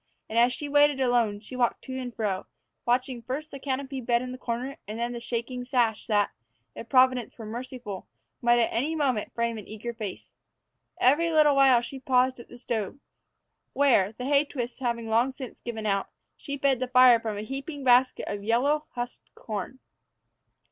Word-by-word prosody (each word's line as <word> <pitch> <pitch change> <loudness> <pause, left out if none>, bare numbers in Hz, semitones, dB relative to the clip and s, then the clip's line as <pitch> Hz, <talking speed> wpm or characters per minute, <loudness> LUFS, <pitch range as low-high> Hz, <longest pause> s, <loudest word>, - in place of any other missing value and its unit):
And, 225 - +1
as 240 +1 +5
she 290 +4 -3
waited 290 -1 +4
alone, 240 -5 +2
she 240 +4 -9
walked 245 -2 0
to 260 - -6
and 250 -1 -5
fro, 205 -5 -2 0.4
watching 250 0 +1
first 275 +6 -5
the 275 - -7
canopied 265 -2 -4
bed 240 0 +2
in 250 - -5
the 255 - -6
corner, 250 +3 -4
and 215 +2 -5
then 235 +1 -2
the 240 - -5
shaking 240 +1 -4
sash 240 -4 0
that, 205 -3 +2 0.4
if 230 - -9
Providence 255 -3 +3
were 225 - -8
merciful, 235 -3 -7 0.3
might 240 0 +4
at 235 - +2
any 285 +8 0
moment 265 -8 0
frame 235 -1 -1
an 205 - -11
eager 220 +3 -6
face. 215 -5 -7 0.7
Every 295 +7 +4
little 305 -3 +5
while 265 -3 +6
she 265 +3 -7
paused 255 -1 +2
at 235 - -12
the 245 - -11
stove, 230 -2 -3 0.8
where, 235 -8 +3
the 250 +3 -6
hay 280 +1 +4
twists 250 -4 -5
having 235 -3 -2
long 230 +4 +3
since 260 -2 -9
given 225 -2 -5
out, 200 -1 0 0.3
she 280 -1 -6
fed 275 -2 +2
the 255 - -1
fire 250 -2 +7
from 220 -2 -4
a 205 - -4
heaping 275 +4 -6
basket 255 0 +4
of 205 0 -4
yellow, 280 +8 +2
husked 245 0 -6
corn. 215 +3 -5
245 Hz, 190 wpm, -27 LUFS, 230-265 Hz, 0.8 s, fire